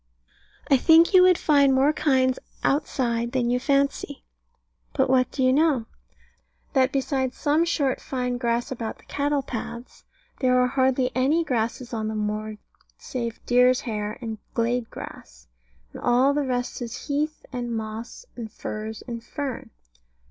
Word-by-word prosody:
I 275 - +7
think 330 +7 +5
you 370 - +8
would 365 -1 +6
find 280 -3 +4
more 275 +3 +4
kinds 260 -4 +2 0.2
outside 240 -4 0
than 245 -2 +1
you 250 - +2
fancy. 280 +1 0 0.7
But 265 -2 +2
what 255 -1 +3
do 265 - -2
you 255 0 +4
know? 290 -5 +2 0.9
That 265 -1 +3
beside 265 -2 -1
some 310 +2 +2
short 285 -6 0
fine 250 -2 -3
grass 235 0 -1
about 230 -3 -4
the - - -22
cattle 285 -1 -1
paths, 235 0 -7 0.4
there 255 -1 +3
are 250 - +4
hardly 260 0 +1
any 285 +6 +2
grasses 240 -2 -2
on 220 -1 -2
the 220 - -3
moor 215 0 -3 0.4
save 235 -3 -5
deer's 250 +1 +4
hair 210 -2 -4
and 225 -3 -5 0.2
glade 235 0 0
grass; - - -10 0.5
and - - -9
all 255 +3 +3
the 285 -1 -1
rest 245 0 -2
is 235 -1 -6
heath, 300 +2 -2
and 240 -1 -3
moss, 220 - -7
and 225 -3 -7
furze, 215 0 -6
and 235 -2 -7
fern. 275 0 -5
255 Hz, 155 wpm, -25 LUFS, 235-280 Hz, 0.9 s, you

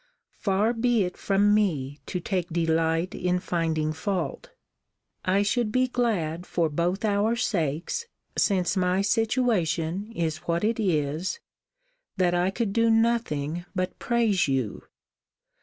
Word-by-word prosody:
Far 205 +3 +2
be 235 -2 +2
it 180 -1 -4
from 205 +1 +2
me 150 -10 0
to 180 - -2
take 180 0 -2
delight 165 +1 +1
in 180 0 0
finding 160 -3 -1
fault; 195 - -3 0.8
I 195 +2 +3
should 220 +1 0
be 255 +2 +2
glad 185 -10 -1
for 165 -2 +1
both 175 +7 -1
our 210 +2 +2
sakes, 180 - -1 0.3
since 185 -3 +2
my 185 +1 +2
situation 205 -4 0
is 160 -5 -1
what 170 +3 -2
it 225 +2 +1
is, 165 - 0 0.8
that 180 -2 +2
I 175 +1 +2
could 195 0 -2
do 230 +1 +3
nothing 200 -9 +1
but 185 0 -2
praise 230 -8 +2
you. 130 -7 -2
185 Hz, 130 wpm, -26 LUFS, 165-220 Hz, 0.8 s, I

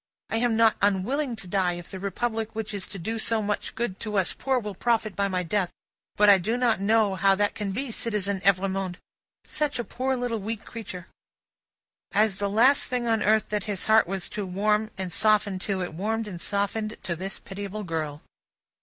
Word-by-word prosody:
I 225 - +1
am 235 -1 +2
not 225 -1 +4
unwilling 235 +7 +1
to 220 -4 -9
die, 180 -1 +1
if 175 0 -9
the 190 - -6
Republic 220 +3 -2
which 220 -1 -3
is 200 -2 -3
to - - -7
do 220 +6 -3
so 225 0 +2
much 205 0 -2
good 225 -5 -2
to 210 -2 -2
us 190 -2 +2
poor, 265 -1 0
will 210 -4 -3
profit 220 -1 0
by 200 +2 +1
my 185 -2 -1
death; 180 +1 0 0.5
but 210 - +5
I 200 -2 +8
do 220 +7 -1
not 240 -5 +2
know 215 0 +3
how 195 +1 +4
that 205 +1 +1
can 205 -2 -3
be, 250 +5 -3
Citizen 205 -4 -1
Evrémonde. 195 -1 +1 0.5
Such 300 -1 -1
a 240 - -1
poor 260 +3 -1
weak - - -5
little 225 -2 -3
creature!" 190 -6 -7 1.1
As 210 -2 +3
the 200 0 0
last 245 +7 +4
thing 250 -1 -1
on 225 -2 +2
earth 215 0 +3
that 210 -2 -1
his 205 -4 -2
heart 220 -3 +5
was 190 0 -2
to 210 - -4
warm 210 +3 +1
and 185 -2 -3
soften 210 -3 +3
to, 190 -1 -1
it 175 - -5
warmed 220 +6 -2
and 175 -4 -7
softened 210 +2 -1
to 170 - -2
this 190 +3 -5
pitiable 200 +2 -6
girl. 155 -4 -3
210 Hz, 205 wpm, -26 LUFS, 190-225 Hz, 1.1 s, I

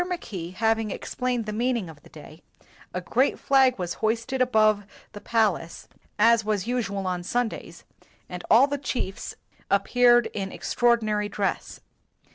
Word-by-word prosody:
Mackay 210 - -5
having 220 +2 0
ex - - -6
plained 250 -2 -1
the 215 - -4
meaning 235 -3 -1
of 155 -3 -13
the - - -18
day, 155 +1 -13 0.5
a 180 - -4
great 250 +9 +1
flag 265 -2 +3
was 175 -3 -3
hoisted 230 +4 -1
above 215 -4 +3 0.3
the 205 - -10
palace, 210 -7 -1 0.3
as 230 +1 +4
was 210 -3 -1
usual 210 -5 -2
on 180 -1 -2
Sundays, 235 +5 -3 0.4
and 180 0 -7
all 235 +5 +7
the 285 0 -3
chiefs 245 -8 -4 0.3
appeared 240 -1 +4
in 195 -2 -4
extraordinary 220 -4 0
dress. 200 -1 -3
220 Hz, 145 wpm, -25 LUFS, 195-245 Hz, 0.5 s, all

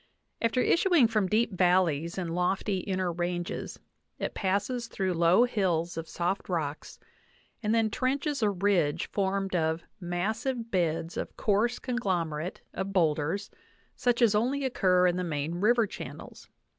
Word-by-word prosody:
After 230 +2 +2
issuing 340 -4 +4
from 215 -4 +1
deep 225 +3 +2
valleys 175 -3 +2
in 180 -3 -2
lofty 185 +3 0
inner 185 -1 -1
ranges 175 0 -3 0.4
it - - -3
passes 205 +5 -1
through 190 -4 -1
low 170 +6 +5
hills 180 -8 0
of 165 0 -5
soft 180 +4 -2
rocks, 155 -4 -3 0.6
and 220 0 +1
then 225 -2 +2
trenches 275 +3 -1
a 215 - +3
ridge 190 -6 +1
formed 195 -1 -1
of 160 0 0 0.2
"massive 220 +7 -2
beds 165 -2 -1
of - - -5
coarse 220 +4 +1
conglomerate 180 - -2
of 190 +1 -3
boulders, 165 +2 +1 0.4
such 245 -1 +1
as 220 -3 +5
only 260 +6 +1
occur 185 -8 +3
in 180 0 +2
the 180 - -1
main 160 +1 -3
river 230 +2 +4
channels. 210 - -9
190 Hz, 145 wpm, -29 LUFS, 175-225 Hz, 0.6 s, low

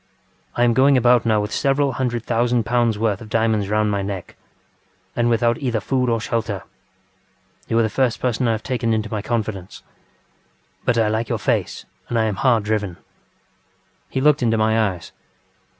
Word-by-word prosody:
I 120 - +2
am 120 -1 +4
going 135 +2 +4
about 120 -1 +4
now 110 -1 +3
with 105 +1 -4
several 140 0 +1
hundred 120 -2 -2
thousand 120 0 +1
pounds 120 -2 +1
worth 105 -2 -1
of 110 - -10
diamonds 110 -3 +1
round 105 0 +1
my 100 -1 -1
neck, 95 -2 -6 0.8
and 120 0 +1
without 120 0 +2
either 120 -5 -1
food 125 +3 0
or 115 -1 +1
shelter. 110 -3 -3 1.0
You 115 - 0
are 115 - +4
the - - +2
first 125 +1 0
person 125 0 0
I 115 - +2
have 110 - -4
taken 120 -3 -1
into 110 -1 -3
my 105 -2 -2
confidence. 105 -4 -4 1.0
But 120 - +2
I 115 -2 +3
like 110 +2 -1
your - - 0
face - - -2 0.2
and 120 - -1
I 115 - +3
am 105 -3 -2
hard 125 -5 +2
driven. 105 -4 -2
ŌĆØ - - -26 1.1
He 130 - -2
looked 150 0 +4
into 115 -2 +2
my 110 -1 +2
eyes. 90 -4 -9
115 Hz, 185 wpm, -21 LUFS, 110-120 Hz, 1.1 s, am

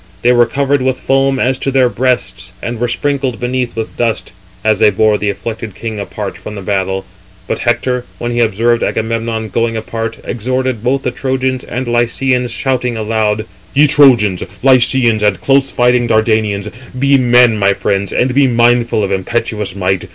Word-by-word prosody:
They 120 - +4
were 120 -1 +4
covered 140 +2 0
with 130 0 0
foam 135 0 +1
as 130 0 0
to - - -2
their 130 -2 +3
breasts, 100 -8 -1
and 120 +3 -5
were 120 - 0
sprinkled 135 -1 -2
beneath 125 0 -2
with 110 -1 -5
dust, 115 -2 -1 0.3
as 110 -2 +2
they 110 - +5
bore 105 +1 +2
the 105 - -1
afflicted 110 0 -5
king 110 -2 -5
apart 100 0 -6
from 105 - -8
the 100 - -7
battle. 95 0 -2 0.4
But - - -2
Hector, 125 +1 0
when 120 - -3
he 120 - -1
observed 115 +1 +1
Agamemnon 115 0 -2
going 115 +2 -1
apart, 115 +1 -4
exhorted 130 0 -2
both 135 +2 0
the 125 - -1
Trojans 130 0 -2
and 125 +1 -5
Lycians, 125 +1 0
shouting 125 -1 -1
aloud: 110 -1 -1 0.3
"Ye 145 +2 +6
Trojans, 120 - +4 0.2
Lycians, 125 -3 +4
and 105 -2 +1
close 135 0 +2
fighting 125 -1 +2
Dardanians, 110 -2 +1 0.3
be 140 +1 +3
men, 120 -3 +4
my 100 0 +3
friends, 100 0 -1
and 125 +1 0
be 140 +1 +4
mindful 120 -2 +2
of 100 - -2
impetuous 105 0 -2
might. 95 -1 -1
120 Hz, 175 wpm, -14 LUFS, 110-130 Hz, 0.4 s, Ye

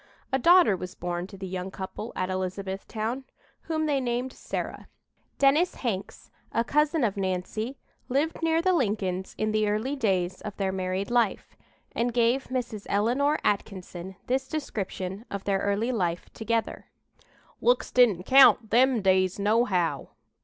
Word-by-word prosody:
A 265 - +3
daughter 345 - +6
was 180 0 -7
born 175 0 -3
to 195 - -12
the 190 - -6
young 185 0 -4
couple 190 +4 -6
at 185 0 -2
Elizabethtown, 195 +6 -3 0.5
whom 315 -1 0
they 285 -3 +1
named 245 +1 -2
Sarah. - - -5 0.5
Dennis 290 +6 +3
Hanks, 200 -6 -4 0.2
a 230 - +1
cousin 300 +3 +2
of 205 -3 0
Nancy, 195 +7 -2 0.3
lived 290 +7 0
near 325 0 +2
the 370 0 +3
Lincolns 200 - -1
in 215 0 0
the 215 -1 +1
early 220 +7 -1
days 185 -7 0
of 210 - -7
their 195 -1 0
married 190 +2 -2
life, 235 -4 0 0.4
and 240 0 -1
gave 240 +3 +2
Mrs. 240 -5 -4
Eleanor 250 +9 +2
Atkinson 190 -3 -3
this 265 +1 0
description 200 -9 -4
of 200 -1 -5
their 195 -1 +1
early 200 +5 0
life 180 -7 -2
together: 225 0 -2 0.7
"Looks - - +2
didn't 220 -8 +4
count 260 -2 +6
them 245 -1 +4
days, 185 -1 +3
nohow. 200 - +1
215 Hz, 145 wpm, -27 LUFS, 190-255 Hz, 0.7 s, daughter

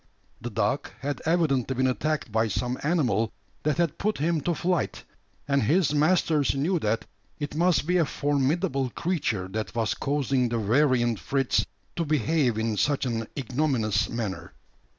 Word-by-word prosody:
The 120 - -4
dog 110 +6 -1
had 140 -1 -3
evidently 140 -7 +2
been 130 +1 +1
attacked 145 0 -1
by 110 +1 +2
some 125 +4 -2
animal 125 - +1 0.3
that 150 0 0
had 170 -3 0
put 215 +1 0
him 160 +2 +1
to 175 +2 0
flight; 180 -1 -1 0.4
and 140 -1 +2
his 155 - +2
masters 155 -2 +2
knew 165 +6 +1
that 110 -3 -1 0.3
it 145 -2 -4
must 170 0 +2
be 180 +2 +2
a 170 - +3
formidable 140 0 0
creature 120 - -1
that 110 +2 -4
was 115 -2 +1
causing 135 -3 0
the 120 - -1
variant 120 0 +2
Fritz 135 -2 0 0.3
to 170 - +1
behave 145 -4 +1
in 110 -1 -1
such 140 +5 +1
an 115 -3 -2
ignominious 125 -6 0
manner. 110 -5 -4
140 Hz, 155 wpm, -26 LUFS, 115-155 Hz, 0.4 s, a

